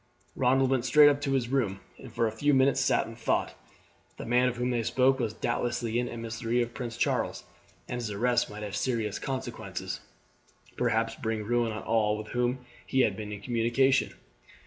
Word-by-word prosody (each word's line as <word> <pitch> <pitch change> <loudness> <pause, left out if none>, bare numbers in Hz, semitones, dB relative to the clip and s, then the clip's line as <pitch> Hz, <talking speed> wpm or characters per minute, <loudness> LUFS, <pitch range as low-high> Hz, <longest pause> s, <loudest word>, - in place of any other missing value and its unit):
Ronald 130 +1 +3
went 130 -3 +2
straight 145 +3 +7
up 145 0 0
to 140 -2 -1
his 125 -3 0
room, 115 -8 0 0.2
and - - -11
for 115 - 0
a 110 - 0
few 145 +6 +2
minutes 135 +1 +3
sat - - +2
in - - -9
thought. - - 0 0.6
The - - -6
man 125 +2 +3
of 120 - -6
whom 125 +1 0
they 120 -1 0
spoke 130 +3 +2
was 115 -4 0
doubtless 120 +2 -2
an 120 +1 -1
emissary 115 +1 -2
of 120 0 -7
Prince 120 -3 -5
Charles, - - 0 0.4
and 125 0 -4
his 115 - -3
arrest 120 +4 +1
might 105 0 -7
have 105 -1 -5
serious 115 -5 -1
consequences, 130 -3 -5 0.8
perhaps 115 0 +1
bring 110 -1 -3
ruin 120 +1 +1
on 110 - -5
all 105 -2 +1
with 110 0 -7
whom 125 +1 -1 0.2
he 130 - +1
had 105 -5 +2
been 105 0 -6
in 105 -1 -6
communication. 120 +4 +2
120 Hz, 190 wpm, -28 LUFS, 110-130 Hz, 0.8 s, straight